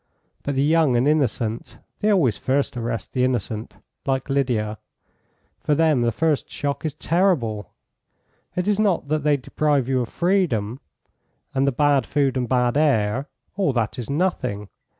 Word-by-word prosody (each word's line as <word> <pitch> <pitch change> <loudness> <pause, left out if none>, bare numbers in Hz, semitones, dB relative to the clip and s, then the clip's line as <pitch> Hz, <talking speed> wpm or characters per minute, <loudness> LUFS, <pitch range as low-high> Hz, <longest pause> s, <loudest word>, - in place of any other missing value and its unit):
But 140 - -3
the 135 - +2
young 155 -3 +3
and 120 +3 +3
innocent 120 -7 0 0.2
(they 210 - +1
always 155 - +3
first 135 0 -1
arrest 115 -4 -4
the 125 - +1
innocent, 120 -3 -2 0.3
like 135 +1 -1
Lydia), 115 -6 0 0.8
for 150 - +1
them 155 -4 +3
the 120 0 +2
first 160 +2 0
shock 145 -1 -3
is 155 -3 -3
terrible. 150 - 0 0.8
It 180 +1 -1
is 210 -1 +2
not 190 -9 +1
that 155 0 +1
they 145 0 +3
deprive 140 0 0
you 130 -1 +1
of 120 - -4
freedom; 155 - 0 0.7
and 135 +1 +1
the - - +3
bad 140 -1 +2
food 140 -2 +1
and 125 -2 -1
bad 125 0 +2
air 135 -3 +1 0.3
all 190 -8 +1
that 115 -1 -1
is 120 - -6
nothing. 130 - -1
135 Hz, 160 wpm, -23 LUFS, 120-155 Hz, 0.8 s, young